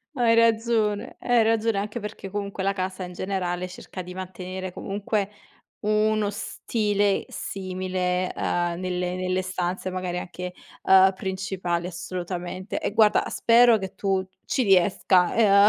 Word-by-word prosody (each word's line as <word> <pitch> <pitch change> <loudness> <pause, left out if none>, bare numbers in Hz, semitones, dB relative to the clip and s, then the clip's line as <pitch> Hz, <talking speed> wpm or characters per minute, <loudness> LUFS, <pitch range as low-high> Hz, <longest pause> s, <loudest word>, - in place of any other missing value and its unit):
Hai 235 -2 +4
ragione 225 -2 +2
hai 240 -2 +3
ragione 225 -1 +2
anche 210 +4 -3
perché 210 -2 -7
comunque 200 -1 -3
la 195 0 +2
casa 185 -1 -3
in 180 0 -7
generale 180 -1 -2
cerca 185 +1 -8
di 180 +1 -9
mantenere 185 0 -6
comunque 200 0 -2 0.5
uno 215 0 +2
stile 205 -1 0
simile, 185 -1 -2
uhm, 175 0 0
nelle 180 -1 -2
nelle 185 0 0
stanze 185 0 -3
magari 185 -1 -3
anche, 180 0 -6 0.3
uhm, 190 0 +6
principali, 185 -2 -2
assolutamente. 180 +1 -5
E - - -2
guarda, 215 -1 +4
spero 235 -1 +5
che 190 0 -6
tu 195 -1 0 0.2
ci 260 - 0
riesca 185 -1 +4
ehm, 205 -2 +6
190 Hz, 135 wpm, -25 LUFS, 185-210 Hz, 0.5 s, uhm